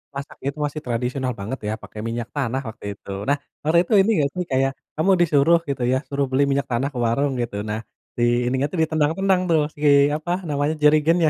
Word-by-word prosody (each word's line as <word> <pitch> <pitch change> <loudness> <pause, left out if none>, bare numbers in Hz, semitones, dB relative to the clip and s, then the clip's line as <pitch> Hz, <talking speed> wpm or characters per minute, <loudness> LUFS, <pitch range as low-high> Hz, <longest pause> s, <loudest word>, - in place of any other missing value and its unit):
masak 140 +1 -7
itu 140 +2 -3
masih 145 +1 -4
tradisional 125 +2 -2
banget 110 +7 -4
ya, 105 - -1
pakai 105 - -10
minyak 115 0 -3
tanah 135 -2 -1
waktu 110 - -9
itu. 100 - -16 0.2
Nah, 145 - +3 0.3
waktu 155 +3 +3
itu 215 - -2
ini 195 +4 +4
nggak 140 -2 +2
sih 180 - -1
kayak, 135 +1 +2 0.2
kamu 170 +6 +2
disuruh 165 +1 +4
gitu 135 -3 -2
ya, 130 - +3
suruh 140 0 0
beli 135 +2 +3
minyak 140 0 0
tanah 125 +4 +1
ke - - -6
warung 140 +5 +1
gitu. 115 -3 -4
Nah, 105 +1 -2 0.4
di 120 - +1 0.2
ininya 130 +2 +1
tuh 180 - -4
ditendang-tendang 165 +5 +1
tuh, 160 -2 +4
si 145 - -13 0.3
apa, 160 +3 -4 0.2
namanya, 145 +1 0
jerigennya. 155 +2 +4
140 Hz, 205 wpm, -22 LUFS, 130-155 Hz, 0.4 s, ini